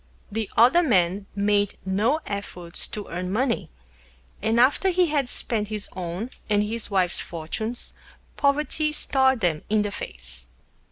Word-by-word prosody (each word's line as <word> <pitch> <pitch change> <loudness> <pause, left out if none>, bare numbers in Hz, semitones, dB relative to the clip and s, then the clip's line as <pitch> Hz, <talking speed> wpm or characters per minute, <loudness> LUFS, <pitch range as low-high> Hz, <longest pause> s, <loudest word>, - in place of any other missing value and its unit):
The 220 -1 -2
Other 255 +10 +7
Man 195 - +2
made 205 0 +2
no 215 +11 +2
Efforts 180 -4 -4
to 210 -2 -6
Earn 180 +2 -3
Money, 220 - 0 0.7
and 220 +3 +2
after 280 +10 +4
he 365 0 +4
had 280 -5 +1
Spent 215 -4 -2
his 210 -1 -3
own 185 +7 -4 0.2
and 205 -1 +3
his 225 +2 -3
Wife's 185 -3 +1
Fortunes, 220 +9 -4 0.4
Poverty 300 +2 +1
Stared 265 -4 +2
them 165 -4 +1
in 215 0 +3
the 205 - -2
Face. 60 - -7
210 Hz, 145 wpm, -25 LUFS, 185-250 Hz, 0.7 s, Other